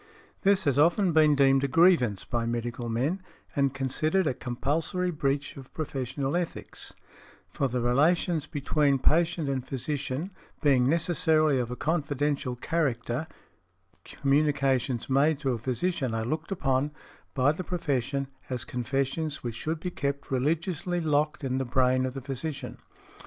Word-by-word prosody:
This 195 Hz, -1 st, +3 dB
has 140 Hz, -2 st, +2 dB
often 175 Hz, +4 st, +4 dB
been 155 Hz, -2 st, +5 dB
deemed 135 Hz, -1 st, +4 dB
a -, -, +2 dB
grievance 140 Hz, -, +4 dB
by 115 Hz, -1 st, -1 dB
medical 120 Hz, 0 st, -3 dB
men, 140 Hz, +12 st, 0 dB, 0.3 s
and 140 Hz, -1 st, +2 dB
considered 155 Hz, +7 st, 0 dB
a 150 Hz, -, +1 dB
compulsory 150 Hz, +9 st, -1 dB
breach 140 Hz, -2 st, -1 dB
of 135 Hz, -1 st, -11 dB
professional 135 Hz, -1 st, -2 dB
ethics; 175 Hz, -1 st, -4 dB, 0.5 s
for 140 Hz, -, -1 dB
the 125 Hz, -1 st, -2 dB
relations 155 Hz, +6 st, +2 dB
between 145 Hz, -2 st, +1 dB
patient 165 Hz, +3 st, +2 dB
and 135 Hz, -2 st, -1 dB
physician, 140 Hz, +5 st, -3 dB, 0.3 s
being 135 Hz, -4 st, +3 dB
necessarily 160 Hz, -3 st, +2 dB
of 120 Hz, -2 st, -2 dB
a 125 Hz, -, -4 dB
confidential 145 Hz, -4 st, -1 dB
character, 130 Hz, -1 st, -1 dB, 0.8 s
communications 135 Hz, -3 st, +1 dB
made 140 Hz, +3 st, +3 dB
to 135 Hz, -3 st, +1 dB
a 115 Hz, -, -3 dB
physician 130 Hz, +1 st, -1 dB
are 110 Hz, 0 st, -1 dB
looked 155 Hz, -, -3 dB
upon, 135 Hz, -6 st, +1 dB, 0.5 s
by 135 Hz, +1 st, +4 dB
the 160 Hz, +4 st, -5 dB
profession, 140 Hz, -6 st, -1 dB, 0.2 s
as 125 Hz, -4 st, -3 dB
confessions 135 Hz, +5 st, -2 dB
which 120 Hz, -2 st, -3 dB
should 155 Hz, +8 st, -3 dB
be 180 Hz, +2 st, -4 dB
kept 140 Hz, -3 st, -3 dB
religiously 165 Hz, +6 st, 0 dB
locked 150 Hz, -2 st, 0 dB
in 130 Hz, -1 st, -1 dB
the -, -, 0 dB
brain 130 Hz, 0 st, +2 dB
of 130 Hz, -, -6 dB
the 135 Hz, -, -4 dB
physician. 135 Hz, +2 st, -5 dB
140 Hz, 145 wpm, -28 LUFS, 130-160 Hz, 0.8 s, been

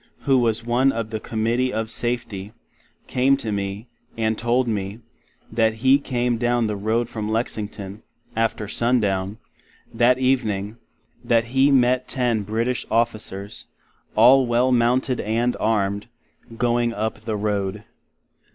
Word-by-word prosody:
who 135 Hz, -2 st, +3 dB
was 115 Hz, -1 st, +1 dB
one 125 Hz, +3 st, +3 dB
of 115 Hz, -3 st, -4 dB
the 110 Hz, -, -3 dB
Committee 115 Hz, +4 st, -1 dB
of 110 Hz, -2 st, -2 dB
Safty, 110 Hz, -4 st, -2 dB, 0.5 s
came 135 Hz, +2 st, +2 dB
to 110 Hz, -, -4 dB
me, 100 Hz, +2 st, -4 dB, 0.3 s
and 110 Hz, -1 st, +1 dB
told 120 Hz, +3 st, +1 dB
me, 100 Hz, -1 st, -3 dB, 0.5 s
that 110 Hz, 0 st, +2 dB
he 135 Hz, +2 st, +6 dB
came 120 Hz, -3 st, -1 dB
down 120 Hz, -1 st, +1 dB
the 105 Hz, -1 st, -2 dB
Road 110 Hz, +4 st, 0 dB
from 110 Hz, -2 st, -5 dB
Lexington, 105 Hz, -3 st, -4 dB, 0.3 s
after 110 Hz, -1 st, -1 dB
Sundown, 105 Hz, -4 st, 0 dB, 0.6 s
that 125 Hz, +1 st, +4 dB
evening; 115 Hz, -5 st, 0 dB, 0.5 s
that 115 Hz, 0 st, +2 dB
He 135 Hz, +1 st, +4 dB
met 125 Hz, -1 st, +3 dB
ten 120 Hz, -4 st, 0 dB
British 115 Hz, +5 st, -1 dB
Officers, 110 Hz, -3 st, -1 dB, 0.5 s
all 125 Hz, +4 st, +6 dB
well 120 Hz, +2 st, +2 dB
mounted, 125 Hz, +1 st, +2 dB
and 115 Hz, +3 st, 0 dB
armed, 100 Hz, -1 st, 0 dB, 0.5 s
going 120 Hz, -1 st, +1 dB
up 110 Hz, 0 st, -2 dB
the 110 Hz, 0 st, -4 dB
Road. 105 Hz, -1 st, -2 dB
115 Hz, 135 wpm, -22 LUFS, 105-125 Hz, 0.6 s, he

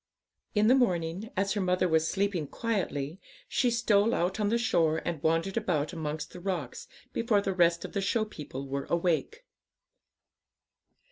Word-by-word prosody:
In 210 Hz, 0 st, +4 dB
the 240 Hz, -, +6 dB
morning, 185 Hz, -5 st, +1 dB
as 195 Hz, +1 st, +1 dB
her 205 Hz, -, -1 dB
mother 185 Hz, 0 st, +2 dB
was 160 Hz, -1 st, +2 dB
sleeping 190 Hz, -6 st, 0 dB
quietly, 175 Hz, -7 st, -2 dB, 0.3 s
she 250 Hz, -, +2 dB
stole 230 Hz, -2 st, +3 dB
out 180 Hz, +4 st, 0 dB
on 205 Hz, -1 st, +1 dB
the 230 Hz, -, +2 dB
shore 165 Hz, -9 st, +2 dB
and 165 Hz, -4 st, -3 dB
wandered 165 Hz, +5 st, +1 dB
about 170 Hz, -8 st, 0 dB
amongst 155 Hz, -2 st, -4 dB
the 180 Hz, -, -8 dB
rocks 190 Hz, 0 st, -4 dB, 0.3 s
before 230 Hz, -3 st, +2 dB
the 195 Hz, -1 st, -1 dB
rest 170 Hz, -2 st, +3 dB
of -, -, -8 dB
the 200 Hz, -, 0 dB
show 215 Hz, +3 st, +1 dB
people 140 Hz, -8 st, -7 dB
were 140 Hz, 0 st, -3 dB
awake. 170 Hz, -, 0 dB
185 Hz, 160 wpm, -29 LUFS, 160-210 Hz, 0.3 s, the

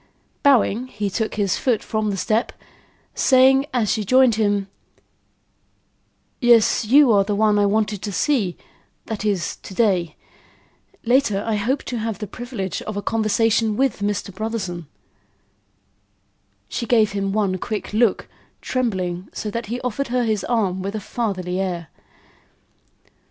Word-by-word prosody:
Bowing, 255 Hz, -3 st, +3 dB
he 205 Hz, -4 st, -4 dB
took 220 Hz, +2 st, -2 dB
his 200 Hz, -4 st, 0 dB
foot 240 Hz, -5 st, +1 dB
from 215 Hz, -1 st, -1 dB
the 195 Hz, -, -2 dB
step, 220 Hz, +4 st, 0 dB, 0.6 s
saying, 265 Hz, +1 st, +4 dB
as 235 Hz, -5 st, +1 dB
she 215 Hz, -, 0 dB
joined 255 Hz, +3 st, +4 dB
him: 205 Hz, -2 st, 0 dB, 1.7 s
"Yes, 235 Hz, -2 st, +4 dB
you 270 Hz, +3 st, +6 dB
are 200 Hz, -2 st, +4 dB
the 205 Hz, +1 st, -2 dB
one 210 Hz, 0 st, +3 dB
I 205 Hz, -, +3 dB
wanted 210 Hz, -1 st, 0 dB
to 205 Hz, -, -4 dB
see; 205 Hz, -5 st, 0 dB, 0.5 s
that 220 Hz, -2 st, -5 dB
is, 200 Hz, -5 st, -1 dB
to 190 Hz, -, -11 dB
day. 180 Hz, -8 st, +1 dB, 0.9 s
Later, 235 Hz, -5 st, +2 dB
I 225 Hz, -, -1 dB
hope 240 Hz, +7 st, -1 dB
to 245 Hz, -, -4 dB
have 225 Hz, -1 st, -3 dB
the 210 Hz, -, -5 dB
privilege 225 Hz, -3 st, -5 dB
of 215 Hz, -2 st, -6 dB
a 205 Hz, -, -3 dB
conversation 220 Hz, 0 st, +1 dB
with 270 Hz, -1 st, +1 dB
Mr. 205 Hz, -1 st, -2 dB
Brotherson." 190 Hz, -6 st, -4 dB, 1.8 s
She 235 Hz, -, -4 dB
gave 220 Hz, -3 st, +3 dB
him 195 Hz, -1 st, -2 dB
one 195 Hz, -3 st, 0 dB
quick 215 Hz, 0 st, -4 dB
look, 220 Hz, -2 st, +2 dB, 0.3 s
trembling 185 Hz, -8 st, -2 dB
so 210 Hz, -, -4 dB
that 230 Hz, 0 st, -4 dB
he 240 Hz, +4 st, -3 dB
offered 255 Hz, +3 st, -2 dB
her 245 Hz, +1 st, 0 dB
his 215 Hz, -4 st, 0 dB
arm 195 Hz, -6 st, 0 dB
with 200 Hz, +3 st, -4 dB
a -, -, -2 dB
fatherly 190 Hz, -4 st, -3 dB
air. 175 Hz, -5 st, -3 dB
215 Hz, 145 wpm, -21 LUFS, 200-235 Hz, 1.8 s, you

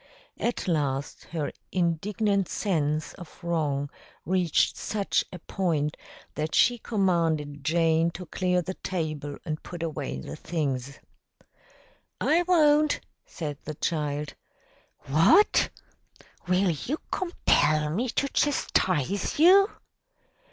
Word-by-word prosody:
At 235 Hz, -4 st, -2 dB
last, 145 Hz, -5 st, -1 dB
her 155 Hz, -3 st, -3 dB, 0.2 s
indignant 195 Hz, +3 st, 0 dB
sense 155 Hz, -6 st, -1 dB
of 175 Hz, -, -12 dB
wrong 150 Hz, -4 st, -1 dB, 0.3 s
reached 180 Hz, -3 st, +2 dB
such 205 Hz, -2 st, 0 dB
a 180 Hz, -, -7 dB
point 160 Hz, -4 st, -1 dB, 0.4 s
that 155 Hz, +1 st, -2 dB
she 240 Hz, 0 st, +4 dB
commanded 165 Hz, -9 st, 0 dB
Jane 165 Hz, 0 st, +3 dB
to 180 Hz, -, -7 dB
clear 180 Hz, 0 st, 0 dB
the 185 Hz, -, -4 dB
table 155 Hz, -7 st, -4 dB
and 155 Hz, -2 st, -3 dB
put 175 Hz, -1 st, -7 dB
away 105 Hz, -, -3 dB
the 70 Hz, +2 st, -7 dB
things. 140 Hz, -, -3 dB, 1.2 s
"I 330 Hz, +3 st, +3 dB
won't," 305 Hz, -4 st, +4 dB, 0.3 s
said 145 Hz, -4 st, -5 dB
the 155 Hz, -, -5 dB
child. 150 Hz, -2 st, -2 dB, 0.7 s
"What! 160 Hz, -, +4 dB, 0.8 s
Will 185 Hz, 0 st, +3 dB
you 240 Hz, -, -3 dB
compel 155 Hz, -, +2 dB
me 235 Hz, +10 st, -1 dB
to 275 Hz, -, 0 dB
chastise 190 Hz, -, 0 dB
you?" 385 Hz, +6 st, +7 dB
170 Hz, 110 wpm, -27 LUFS, 150-195 Hz, 1.2 s, you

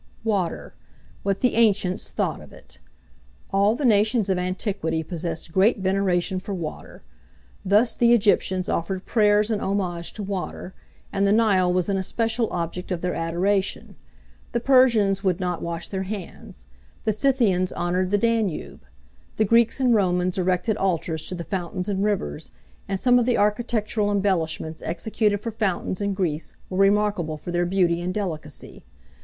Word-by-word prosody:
WATER: 200 Hz, -7 st, -2 dB, 0.5 s
WHAT 195 Hz, -1 st, -1 dB
THE 250 Hz, -, +2 dB
ANCIENTS 205 Hz, -5 st, +2 dB
THOUGHT -, -, -2 dB
OF -, -, -14 dB
IT. 60 Hz, +3 st, -14 dB, 0.7 s
All 200 Hz, +3 st, +3 dB
the 275 Hz, -, -2 dB
nations 215 Hz, -2 st, +3 dB
of 185 Hz, -, +1 dB
antiquity 180 Hz, -3 st, -2 dB
possessed 165 Hz, 0 st, -4 dB
great 195 Hz, +7 st, +3 dB
veneration 190 Hz, -1 st, 0 dB
for 195 Hz, +1 st, -5 dB
water: 165 Hz, -4 st, -7 dB, 0.6 s
thus, 210 Hz, +5 st, +3 dB
the 235 Hz, -1 st, +3 dB
Egyptians 200 Hz, -4 st, +2 dB
offered 185 Hz, +3 st, -2 dB
prayers 210 Hz, -1 st, +3 dB
and 210 Hz, -, -1 dB
homage 180 Hz, -4 st, -2 dB
to 210 Hz, -, -6 dB
water, 190 Hz, -1 st, -5 dB, 0.4 s
and 200 Hz, 0 st, +2 dB
the -, -, +3 dB
Nile 200 Hz, -5 st, +3 dB
was 180 Hz, -1 st, 0 dB
an 200 Hz, -1 st, 0 dB
especial 225 Hz, +4 st, -1 dB
object 175 Hz, +1 st, -4 dB
of 175 Hz, -2 st, -2 dB
their 180 Hz, 0 st, -1 dB
adoration; 185 Hz, +4 st, -1 dB, 0.6 s
the 235 Hz, -, +1 dB
Persians 230 Hz, -6 st, +4 dB
would 185 Hz, -3 st, +1 dB
not 180 Hz, -2 st, -2 dB
wash 170 Hz, 0 st, -4 dB
their 190 Hz, -1 st, -3 dB
hands; 190 Hz, -, -8 dB, 0.4 s
the 215 Hz, -, +1 dB
Scythians 215 Hz, -7 st, +2 dB
honoured 180 Hz, +1 st, -1 dB
the 205 Hz, -, +2 dB
Danube; 225 Hz, -5 st, -1 dB, 0.5 s
the 215 Hz, -, +2 dB
Greeks 230 Hz, +4 st, +3 dB
and 255 Hz, -2 st, +3 dB
Romans 180 Hz, -3 st, +1 dB
erected 185 Hz, +4 st, 0 dB
altars 165 Hz, -5 st, -1 dB
to 185 Hz, -, -4 dB
the 170 Hz, -, -5 dB
fountains 185 Hz, 0 st, -4 dB
and 200 Hz, -1 st, -1 dB
rivers; 200 Hz, -, -2 dB, 0.4 s
and 195 Hz, -1 st, -2 dB
some 245 Hz, +2 st, +4 dB
of 240 Hz, -, 0 dB
the 245 Hz, -, +2 dB
architectural 210 Hz, 0 st, 0 dB
embellishments 175 Hz, -6 st, -1 dB
executed 210 Hz, +3 st, -1 dB
for 230 Hz, -, -4 dB
fountains 195 Hz, -3 st, -2 dB
in 200 Hz, -1 st, -1 dB
Greece 165 Hz, -5 st, -2 dB, 0.2 s
were 185 Hz, -, -2 dB
remarkable 195 Hz, -5 st, +2 dB
for 175 Hz, -, -7 dB
their 175 Hz, 0 st, 0 dB
beauty 175 Hz, -2 st, +1 dB
and 180 Hz, +1 st, -2 dB
delicacy. 160 Hz, -7 st, -6 dB
195 Hz, 160 wpm, -24 LUFS, 180-210 Hz, 0.7 s, Persians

